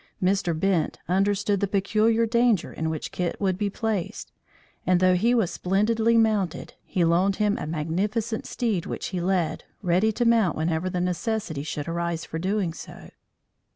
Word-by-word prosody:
Mr. 180 Hz, -3 st, +1 dB
Bent 185 Hz, -4 st, +1 dB
understood 200 Hz, +2 st, +1 dB
the 200 Hz, -, 0 dB
peculiar 215 Hz, +4 st, +2 dB
danger 235 Hz, -4 st, +2 dB
in 160 Hz, 0 st, -2 dB
which 155 Hz, -2 st, -4 dB
Kit 180 Hz, -1 st, -3 dB
would 190 Hz, -2 st, +1 dB
be 205 Hz, +2 st, -1 dB
placed, 215 Hz, -3 st, -3 dB, 0.5 s
and 180 Hz, -1 st, +3 dB
though 185 Hz, 0 st, +4 dB
he 230 Hz, +7 st, +3 dB
was 220 Hz, -8 st, +1 dB
splendidly 220 Hz, +5 st, +2 dB
mounted, 215 Hz, -6 st, +1 dB
he 175 Hz, -3 st, 0 dB
loaned 180 Hz, +4 st, +3 dB
him 210 Hz, 0 st, +1 dB
a -, -, -4 dB
magnificent 200 Hz, +9 st, -2 dB
steed 220 Hz, -9 st, -1 dB
which -, -, -4 dB
he 180 Hz, -2 st, -3 dB
led, 175 Hz, -3 st, 0 dB, 0.2 s
ready 185 Hz, +5 st, +3 dB
to 240 Hz, +3 st, -1 dB
mount 225 Hz, -8 st, +3 dB
whenever 160 Hz, +3 st, 0 dB
the 180 Hz, -, -2 dB
necessity 180 Hz, -3 st, -2 dB
should 145 Hz, 0 st, -5 dB
arise 170 Hz, -1 st, -2 dB
for 160 Hz, -, -5 dB
doing 190 Hz, -1 st, -1 dB
so. -, -, -11 dB
190 Hz, 165 wpm, -25 LUFS, 170-215 Hz, 0.5 s, though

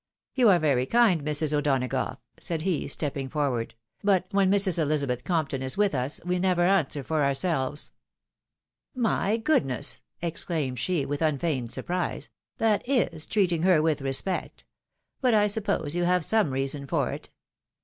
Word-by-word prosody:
" -, -, -67 dB
You 250 Hz, -4 st, +4 dB
are 185 Hz, -, +6 dB
very 140 Hz, -6 st, +1 dB
kind, 230 Hz, -9 st, +4 dB
Mrs. 150 Hz, 0 st, 0 dB
O'Donagough," 135 Hz, -4 st, 0 dB, 0.2 s
said 165 Hz, -2 st, -2 dB
he, 185 Hz, -3 st, -1 dB
stepping 140 Hz, -2 st, -3 dB
forward; 130 Hz, -7 st, -2 dB
" -, -, -43 dB
but 195 Hz, -3 st, +3 dB
when 195 Hz, -2 st, +3 dB
Mrs. 195 Hz, -4 st, +2 dB
Elizabeth 140 Hz, -5 st, 0 dB
Compton 155 Hz, -6 st, -1 dB
is 130 Hz, +4 st, -4 dB
with 205 Hz, -3 st, +2 dB
us, 130 Hz, +2 st, -2 dB
we 180 Hz, 0 st, 0 dB
never 180 Hz, -1 st, +2 dB
answer 165 Hz, -7 st, +1 dB
for 155 Hz, +1 st, 0 dB
ourselves." 140 Hz, 0 st, -1 dB, 1.0 s
"My 225 Hz, -3 st, +1 dB
goodness!" 145 Hz, -, 0 dB, 0.2 s
exclaimed 160 Hz, -6 st, -3 dB
she, 165 Hz, -1 st, 0 dB
with 145 Hz, +1 st, -3 dB
unfeigned 145 Hz, -5 st, 0 dB
surprise, 175 Hz, +8 st, -3 dB
" -, -, -60 dB
that 210 Hz, -2 st, +2 dB
is 170 Hz, -, 0 dB
treating 180 Hz, -6 st, +1 dB
her 180 Hz, -2 st, +4 dB
with 155 Hz, -2 st, +1 dB
respect! 135 Hz, +8 st, -2 dB, 0.6 s
But 250 Hz, -4 st, +3 dB
I 210 Hz, -1 st, +4 dB
suppose 200 Hz, -7 st, -1 dB
you 175 Hz, 0 st, +1 dB
have 180 Hz, -2 st, +2 dB
some 220 Hz, -7 st, +2 dB
reason 135 Hz, +1 st, -1 dB
for -, -, 0 dB
it. -, -, -7 dB
160 Hz, 160 wpm, -26 LUFS, 140-190 Hz, 1.0 s, are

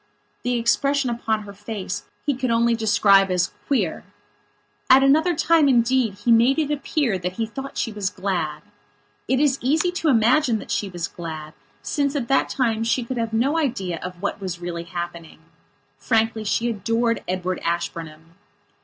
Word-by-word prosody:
The 245 Hz, 0 st, -1 dB
expression 270 Hz, +3 st, +1 dB
upon 220 Hz, -2 st, -1 dB
her 200 Hz, -1 st, -10 dB
face 205 Hz, -1 st, -5 dB, 0.2 s
he 290 Hz, -, +2 dB
could 255 Hz, 0 st, -2 dB
only 235 Hz, 0 st, +3 dB
describe 205 Hz, -3 st, +4 dB
as 180 Hz, 0 st, +1 dB, 0.2 s
"queer". 215 Hz, -, 0 dB, 0.9 s
At 265 Hz, +1 st, +7 dB
another 315 Hz, +6 st, +4 dB
time, 320 Hz, -2 st, +4 dB
indeed, 240 Hz, -3 st, +2 dB
he 235 Hz, +4 st, 0 dB
made 235 Hz, +5 st, +5 dB
it 300 Hz, -2 st, 0 dB
appear 280 Hz, -, 0 dB
that 180 Hz, +1 st, -3 dB
he 225 Hz, +4 st, -2 dB
thought 270 Hz, +5 st, -8 dB
she 225 Hz, -, -1 dB
was 205 Hz, -3 st, -2 dB
glad. 185 Hz, -6 st, -3 dB, 0.6 s
It 260 Hz, -, +2 dB
is 275 Hz, -2 st, +2 dB
easy 315 Hz, +8 st, +2 dB
to 345 Hz, -3 st, 0 dB
imagine 240 Hz, +1 st, +3 dB
that 205 Hz, -, -8 dB
she 205 Hz, -1 st, -1 dB
was 175 Hz, -2 st, -4 dB
glad, 155 Hz, -2 st, -7 dB, 0.3 s
since 285 Hz, -1 st, -1 dB
at 250 Hz, -5 st, -2 dB
that 270 Hz, -, +2 dB
time 225 Hz, -4 st, 0 dB
she 235 Hz, +2 st, +1 dB
could 250 Hz, +2 st, -5 dB
have 230 Hz, -1 st, -1 dB
had 225 Hz, 0 st, 0 dB
no 285 Hz, +7 st, +2 dB
idea 195 Hz, -, -2 dB
of 180 Hz, +1 st, -8 dB
what 200 Hz, -, -2 dB
was 180 Hz, -3 st, -4 dB
really 170 Hz, -1 st, -5 dB
happening. 170 Hz, -1 st, -6 dB, 0.6 s
Frankly, 225 Hz, 0 st, +1 dB
she 230 Hz, +3 st, 0 dB
adored 230 Hz, +2 st, 0 dB
Edward 185 Hz, 0 st, -2 dB
Ashburnham. 165 Hz, -1 st, -4 dB
225 Hz, 170 wpm, -23 LUFS, 185-260 Hz, 0.9 s, At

